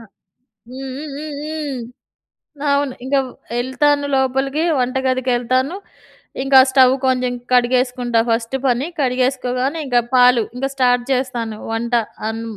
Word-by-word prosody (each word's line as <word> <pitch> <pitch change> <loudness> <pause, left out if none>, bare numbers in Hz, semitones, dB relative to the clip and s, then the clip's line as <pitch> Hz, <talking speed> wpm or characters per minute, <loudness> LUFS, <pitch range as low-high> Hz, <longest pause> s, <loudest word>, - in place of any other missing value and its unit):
ఆ! - - -12 0.7
హ్మ్. 265 +1 -7
హ్మ్. 300 0 -7
హ్మ్. 295 -1 -6
హ్మ్. 300 -5 -4 0.9
అవును. 280 -2 0
ఇంక 275 +2 -2 0.3
వే 235 - -4
ఎళ్తాను 285 +2 +1
లోపలికి 270 +3 0 0.2
వంటగదికేళ్తాను. 255 +2 0 0.7
ఇంకా 270 0 +5
స్టవ్ 260 -1 +5
కొంచెం 255 -1 +1 0.2
కడిగేసుకుంటా 250 -1 +2
ఫస్ట్ 230 +3 0
పని. 250 +3 +1
కడిగేసుకోగానే 255 +2 0
ఇంకా 245 -2 +3
పాలు 250 -2 +6
ఇంగా 270 +2 -1
స్టార్ట్ 245 -2 +2
చేస్తాను. 240 -4 -2
వంట 235 +2 -3 0.4
అన్ 225 +1 -4
255 Hz, 120 wpm, -19 LUFS, 245-270 Hz, 0.9 s, పాలు